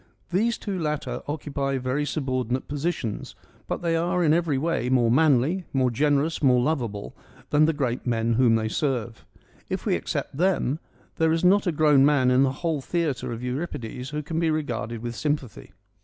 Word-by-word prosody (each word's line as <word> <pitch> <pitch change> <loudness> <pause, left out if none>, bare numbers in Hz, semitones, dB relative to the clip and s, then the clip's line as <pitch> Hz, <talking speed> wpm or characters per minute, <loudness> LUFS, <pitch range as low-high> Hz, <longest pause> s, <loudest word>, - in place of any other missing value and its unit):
These 230 +6 +1
two 195 -3 -4
latter 150 -2 -2
occupy 140 -2 -2
very 130 +3 -1
subordinate 130 -3 -2
positions, 145 -6 -3 0.3
but - - -3
they 165 -1 +1
are 175 +2 +1
in 155 -2 +4
every 165 -4 +1
way 135 -5 -1
more 120 -3 +3
manly, 155 +5 +3
more 130 -2 +2
generous, 145 +5 +1
more 130 -3 +5
lovable 120 -7 -2 0.4
than 150 +1 +5
the 160 - +3
great 130 -4 -2
men 115 -1 +1
whom 115 -1 +4
they 110 -1 0
serve. 120 -2 -2 0.4
If - - -3
we - - +2
except - - -3
them, 165 -4 +1 0.4
there 160 0 +3
is 165 +1 0
not 195 +2 +4
a - - +3
grown 150 -3 +4
man 140 -3 +4
in 125 +1 +4
the 135 -1 +3
whole 160 -4 0
theatre 155 -5 -2
of 115 +1 -6
Euripides 125 -2 -4
who 150 0 -4
can 160 +2 -3
be 165 -1 +2
regarded 120 -7 -3
with 120 0 -4
sympathy. 135 - -3
140 Hz, 180 wpm, -25 LUFS, 125-160 Hz, 0.4 s, more